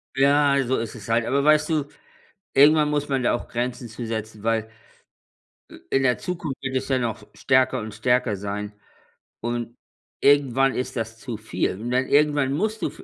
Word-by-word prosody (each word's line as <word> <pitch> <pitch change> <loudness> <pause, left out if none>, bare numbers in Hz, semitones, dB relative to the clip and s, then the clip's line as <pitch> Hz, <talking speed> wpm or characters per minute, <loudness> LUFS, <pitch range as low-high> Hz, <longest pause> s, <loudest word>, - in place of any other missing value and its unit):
Ja, 140 +1 +4
so 130 +2 0
ist 115 0 -4
es 110 -2 -10
halt. 115 0 +2
Aber 140 +3 +1
weißt 150 +1 +4
du, 155 -3 +1 0.7
irgendwann 150 +1 +6
muss 145 -1 -1
man 135 -2 0
da 120 - +2
auch 120 - -5
Grenzen 120 0 -3
zu 115 +2 -7
setzen, 110 -1 -5
weil 110 0 0 1.0
i - - -11
in 135 - +2
der 125 -1 +2
Zukunft 165 -6 -4
wird 135 -1 -4
es 130 - -2
ja 130 -1 +2
noch 115 -3 -3
stärker 130 -1 +2
und 110 -2 -7
stärker 125 -1 +1
sein. 100 +1 -5 0.7
Und 120 0 -3 0.5
irgendwann 135 -2 +4
ist 125 - -3
das 115 -1 -4
zu 115 -2 -6
viel. 95 -3 -2
Und 120 +3 -4
dann 130 +1 +1
irgendwann 145 -2 +3
musst 215 +8 -1
du - - +1
f - - -11
125 Hz, 190 wpm, -24 LUFS, 115-140 Hz, 1.0 s, irgendwann